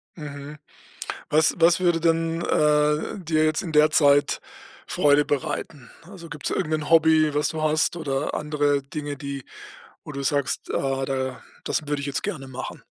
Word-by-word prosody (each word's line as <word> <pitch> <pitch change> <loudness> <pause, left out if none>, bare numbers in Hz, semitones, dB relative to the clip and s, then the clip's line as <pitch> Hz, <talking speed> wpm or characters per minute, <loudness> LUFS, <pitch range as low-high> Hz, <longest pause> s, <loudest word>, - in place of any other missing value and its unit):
Mhm. 145 -1 -8 0.7
Was 155 +1 +3
was 170 +1 +4
würde 175 -2 +2
denn, 165 0 +1
äh, 150 +4 +1
dir 155 -3 +1
jetzt 155 0 +1
in 170 - -6
der 150 0 +5
Zeit 145 -2 +3 0.5
Freude 145 0 +3
bereiten? 140 -2 -4
Also, 170 -1 -12
gibt's 145 -1 -5
da - - -2
irgend'nen 155 0 -2
Hobby, 160 -2 +5
was 150 - +1
du 155 -1 -4
hast, 155 +2 +1
oder 140 -3 -2
andere 145 -2 0
Dinge, 145 +1 -6
die 140 -1 -6 0.6
wo 150 - -8
du 140 0 -5
sagst: 140 0 -1
„Ah, 135 -1 -1
da 130 -1 -3 0.2
das 150 - -2
würde 145 -1 -1
ich 140 - -5
jetzt 140 +6 -3
gerne 155 -10 -4
machen.“ 130 0 -7
150 Hz, 165 wpm, -24 LUFS, 140-160 Hz, 0.7 s, der